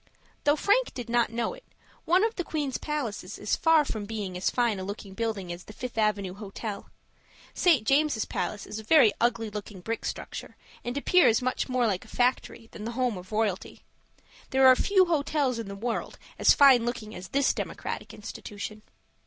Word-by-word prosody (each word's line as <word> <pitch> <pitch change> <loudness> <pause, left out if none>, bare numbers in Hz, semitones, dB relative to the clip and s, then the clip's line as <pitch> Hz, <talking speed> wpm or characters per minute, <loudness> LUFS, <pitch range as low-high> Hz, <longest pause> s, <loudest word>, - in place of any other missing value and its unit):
Though 290 0 +5
Frank 410 +10 +2
did 245 -3 -6
not 240 -2 +3
know 235 - -2
it, - - -13 0.4
one 365 +4 +4
of 445 0 +1
the 360 - -3
queen's 295 -5 -3
palaces 235 -10 -4
is 210 - 0
far 325 -2 +4
from 215 -6 -4
being 205 -4 -5
as 180 - 0
fine 235 -5 +1
a - - -4
looking 200 0 -7
building 200 -5 -3
as 175 +1 -10
the 215 - -11
Fifth 250 +3 -6
Avenue 210 -4 0
Hotel. 205 +1 -7 0.6
St. 315 -12 +3
James' 275 -4 +2
Palace 210 - -3
is 210 +1 -6
a - - -9
very 235 -3 +6
ugly 230 -2 +1
looking 205 -1 -7
brick 225 +5 -4
structure, - - -6 0.3
and 245 +3 -3
appears 285 -6 +4
much 255 +1 -2
more 250 -1 +2
like 195 -5 0
a - - -17
factory 245 -2 -1
than - - -10
like - - -4
the - - -5
home 250 -4 +1
of 185 +2 -10
royalty. 210 -3 -2 0.7
There 265 0 +4
are 260 0 +9
few 380 +6 +4
hotels 290 -6 0
in 225 - -5
the 200 - -6
world 230 +3 -3 0.2
as - - +6
fine 270 -4 +7
looking 230 -3 -4
as 180 +1 -8
this 275 +7 +2
democratic - - -5
institution. 210 +1 -8
230 Hz, 195 wpm, -27 LUFS, 210-275 Hz, 0.7 s, are